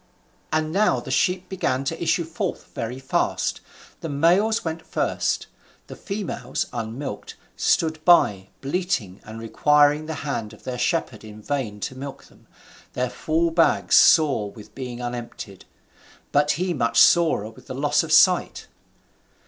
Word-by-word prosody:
And 155 0 0
now 205 +5 +2
the - - -8
sheep 185 0 +1
began 135 -8 -1
to 165 +4 -4
issue 170 0 +1
forth 160 0 -5
very 115 +2 -4
fast; 130 0 -1 0.4
the 165 - -5
males 175 +10 +2
went 160 0 -3
first, 160 - -1 0.4
the - - -10
females, 200 -1 -4
unmilked, 115 0 -5 0.2
stood 160 -1 +1
by, 105 - +4
bleating 140 - -2
and 110 +1 -9
requiring 150 +6 +3
the 160 - -4
hand 115 -7 -3
of 110 - -16
their 125 -1 -5
shepherd 125 -5 -1
in 110 -1 -11
vain 110 -3 -3
to - - -4
milk 135 +1 -8
them, - - -22 0.5
their 125 0 -2
full 160 +6 0
bags 165 0 +3
sore 140 -10 +5
with 105 0 -14
being 125 -2 -6
unemptied, 120 -5 -7 0.7
but 145 +1 +3
he 180 +1 -1
much 115 -5 +1
sorer 160 -11 +4
with - - -18
the - - -6
loss - - +2
of - - -6
sight. - - +4
145 Hz, 150 wpm, -23 LUFS, 115-165 Hz, 0.7 s, sore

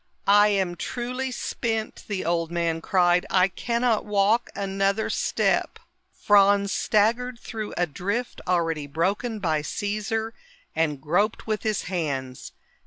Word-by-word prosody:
"I 205 +1 +6
am 190 -4 0
truly 250 +5 -3
spent!" 225 -3 -3
the 200 -5 -3
old 165 -1 0
man 170 -1 -1
cried. 180 0 +3
"I 185 0 +4
cannot 235 +3 0
walk 210 +3 +2
another 195 +1 0
step." - - 0 0.3
Franz 200 -1 +4
staggered 235 +4 +1
through 220 -3 -6
a 175 - +2
drift 200 - -3
already 165 -4 0
broken 195 - -1
by 160 -6 0
Caesar 215 +5 -3 0.4
and 150 -3 0
groped 180 +10 0
with 215 -1 -1
his 215 -2 -1
hands. 140 -8 -4
200 Hz, 125 wpm, -25 LUFS, 175-220 Hz, 0.4 s, I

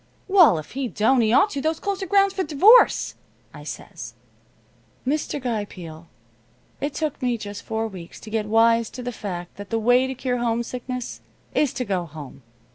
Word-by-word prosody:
"'Well, 365 - +6
if 155 - -8
he 265 0 -2
don't, 235 +3 +2
he 220 -1 +2
ought 390 - +4
to. 280 - -3
Those 315 +2 -1
clothes 400 -1 -3
are 385 - -3
grounds 395 -1 +4
for 385 - -2
divorce,' 380 - +5 0.4
I - - -10
says. - - -8 0.9
"Mr. 290 +2 -1
Guy 235 -5 -2
Peel, 165 -4 -10 0.7
it 285 0 -3
took 305 -3 -3
me 245 -2 0
just 205 -2 -7
four 225 0 -2
weeks 185 -5 -10
to 215 - -10
get 215 -1 -1
wise 230 +1 +3
to 250 - -8
the 245 - -3
fact 180 -6 -7
that 205 0 -9
the 225 - 0
way 245 +3 +3
to 265 - -4
cure 250 -1 -2
homesickness 240 +1 -3 0.3
is 290 -4 +2
to 250 - -3
go 185 -4 -2
home. 145 -3 -10
240 Hz, 190 wpm, -23 LUFS, 210-280 Hz, 0.9 s, Well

